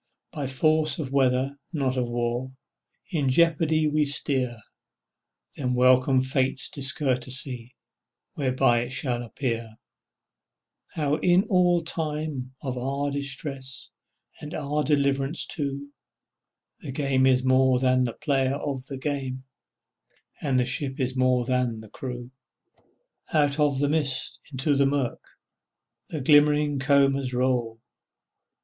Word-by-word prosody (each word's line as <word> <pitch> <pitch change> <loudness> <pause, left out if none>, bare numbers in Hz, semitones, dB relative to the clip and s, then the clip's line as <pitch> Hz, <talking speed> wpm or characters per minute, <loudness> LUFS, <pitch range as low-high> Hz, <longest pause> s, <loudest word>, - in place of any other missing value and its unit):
By 145 -3 -4
force 155 +2 +2
of 140 -5 -5
weather 135 +1 +1
not 135 -4 0
of 125 -2 -1
war 120 +2 -2 0.6
In 145 -6 0
jeopardy 160 +1 +3
we 150 0 +2
steer, 130 -4 0 1.0
Then 125 -2 -1
welcome 130 +1 +4
Fate's 130 0 0
discourtesy 130 -3 -1 0.6
Whereby 130 -3 +2
it 120 - -4
shall 130 -2 -1
appear, 115 -2 -4 1.2
How 150 -1 0
in 180 +2 +3
all 175 -3 +2
time 150 -5 -4
of 130 -2 -3
our 140 +3 -2
distress, 135 -1 -5 0.5
And 150 +1 -7
our 150 0 -1
deliverance 140 +1 +1
too, 140 -4 -4 0.9
The - - -7
game 135 -1 +1
is 130 -1 +3
more 130 0 +4
than 130 0 +2
the 120 - -3
player 135 -1 0
of 140 -3 -4
the 135 - -6
game, 130 -2 -4 1.0
And 135 -4 +1
the 125 - +2
ship 135 +2 +2
is 130 -1 -1
more 130 -1 +2
than 125 -3 0
the 110 - -13
crew. 125 +1 -7 1.0
Out 145 -1 +2
of 145 -2 +2
the 145 +1 +1
mist 145 -3 0
into 140 +2 +1
the 140 0 +3
mirk 135 -3 -1 0.9
The 155 - -4
glimmering 145 0 +4
combers 135 -1 +2
roll. 125 -3 0
135 Hz, 125 wpm, -25 LUFS, 130-145 Hz, 1.2 s, welcome